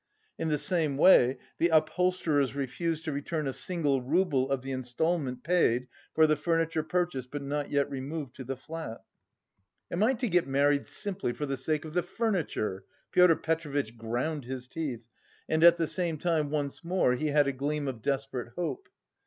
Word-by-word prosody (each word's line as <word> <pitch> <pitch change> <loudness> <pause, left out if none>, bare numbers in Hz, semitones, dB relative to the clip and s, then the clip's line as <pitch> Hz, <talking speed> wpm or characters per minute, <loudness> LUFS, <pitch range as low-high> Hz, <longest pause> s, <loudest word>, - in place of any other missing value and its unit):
In 160 - -1
the 150 - +2
same 150 -2 0
way 135 -6 +6 0.2
the 170 - +4
upholsterers 160 -3 +2
refused 160 +4 -2
to 155 - -1
return 150 +2 -3
a 135 - -2
single 145 -7 0
rouble 140 -1 +1
of 135 -2 -1
the 135 - -5
instalment 130 +1 -1
paid 125 -8 +2 0.3
for 160 - +6
the 155 0 +3
furniture 165 +1 0
purchased 155 -6 -2
but 145 0 -5
not 145 +1 -2
yet 140 -1 +2
removed 140 0 -5
to 130 - -6
the 130 +1 -4
flat. 150 -4 -7 0.9
"Am 175 - -1
I 245 +5 +4
to 245 +1 -2
get 180 -6 +2
married 140 +1 +2
simply 200 - -3
for 150 - -3
the 135 -1 -2
sake 150 +4 -2
of 155 - -8
the 180 - +2
furniture?" 175 - -2 0.3
Pyotr 180 -2 +6
Petrovitch 145 -8 -2
ground 120 +6 -3
his 130 0 -6
teeth 130 -5 -4 0.4
and 160 +1 +1
at 170 0 +8
the 165 - +1
same 170 -1 -2
time 155 -2 0
once 145 0 -3
more 175 -7 +2
he 140 +5 -1
had 145 0 +4
a 140 - 0
gleam 145 +2 -2
of 125 -4 -4
desperate 135 -2 -2
hope. 370 - -4
150 Hz, 180 wpm, -29 LUFS, 135-165 Hz, 0.9 s, at